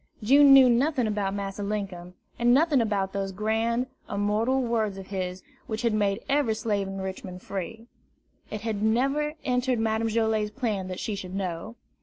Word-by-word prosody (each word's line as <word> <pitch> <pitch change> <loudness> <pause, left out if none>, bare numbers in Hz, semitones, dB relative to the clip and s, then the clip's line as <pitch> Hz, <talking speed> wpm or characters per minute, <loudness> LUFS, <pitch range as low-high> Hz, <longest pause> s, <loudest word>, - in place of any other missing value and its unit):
June 280 +5 +7
knew 270 -1 +9
nothing 255 +2 +2
about 205 -2 -1
Massa 200 0 -4
Linkum, 195 -4 -4 0.2
and 240 0 +4
nothing 295 -3 +4
about 200 -3 -1
those 195 -1 -2
grand, 225 +4 0 0.2
immortal 210 +6 +1
words 225 -5 0
of 190 -1 -9
his 185 -1 -4 0.2
which 220 +1 -3
had 230 -2 +2
made 205 0 0
every 275 -5 +2
slave 210 -3 -1
in 195 0 -5
Richmond 190 -1 -6
free; 220 +4 -6 0.6
it 210 - -5
had 220 -2 -3
never 275 +7 +1
entered 250 0 +1
Madame 225 0 0
Joilet's 220 -1 +1
plan 210 -5 -2
that 185 0 -5
she 215 - -3
should 190 -2 -6
know. 190 +3 -4
215 Hz, 170 wpm, -26 LUFS, 195-235 Hz, 0.6 s, knew